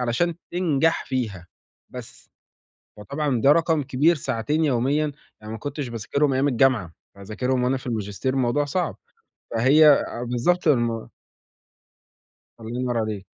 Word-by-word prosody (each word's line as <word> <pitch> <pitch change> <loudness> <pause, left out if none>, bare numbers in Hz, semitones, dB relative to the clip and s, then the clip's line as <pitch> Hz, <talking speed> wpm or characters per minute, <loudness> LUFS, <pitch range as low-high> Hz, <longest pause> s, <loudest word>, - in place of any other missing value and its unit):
علشان 125 +8 0 0.2
تنجح 165 -3 +1
فيها 110 -9 -3 0.4
بس. - - -11 0.7
فطبعًا 135 +4 -2
ده 140 +5 +6
رقم 165 -1 +2
كبير 145 +5 +2
ساعتين 140 +4 -1
يوميًا، 145 +3 +1 0.3
يعني 105 0 -8
ما 110 - -6
كنتش 145 +2 -5
باذاكرهم 120 +5 -1
أيام 135 +2 +2
الجامعة، 120 -9 +2 0.2
فهاذاكرهم 115 +6 -2
وأنا 130 +2 +1
في 130 - -10
الماجستير 110 +3 -3
الموضوع 135 +3 +1
صعب. 170 +4 -2 0.6
فهي 145 +7 +6
أ 140 -4 +2
بالضبط 140 +9 0
الم 120 -5 +1 1.5
الله 115 +2 -6
ينور 125 -2 -1
عليك. 110 -3 -3
130 Hz, 130 wpm, -23 LUFS, 115-145 Hz, 1.5 s, ده